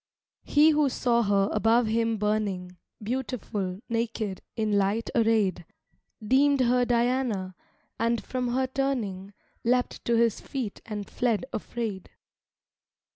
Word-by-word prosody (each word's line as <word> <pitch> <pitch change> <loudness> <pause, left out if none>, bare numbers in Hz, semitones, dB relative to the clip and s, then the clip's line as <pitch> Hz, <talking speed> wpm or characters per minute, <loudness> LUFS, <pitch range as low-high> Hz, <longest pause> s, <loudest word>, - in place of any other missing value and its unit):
He 300 +2 +5
who 300 -2 +3
saw 240 -2 +1
her 200 -2 +2
above 225 +2 +3
him 225 0 +1
burning, 200 -4 -1 0.3
Beautiful, 215 -5 -3
naked, 230 -4 -2
in 215 -2 0
light 200 +3 +1
arrayed, 220 -6 +2 0.6
Deemed 275 +2 +4
her 250 0 +3
Diana, 240 -5 0 0.5
and 230 0 +1
from 255 -1 -2
her 260 +2 +1
turning, 245 -8 -2 0.3
Leapt 245 +1 0
to 235 - +2
his 230 -2 +2
feet 250 -7 -5
and 210 -2 -5
fled 240 -2 0
afraid. 215 -4 -4
230 Hz, 120 wpm, -27 LUFS, 205-250 Hz, 0.6 s, He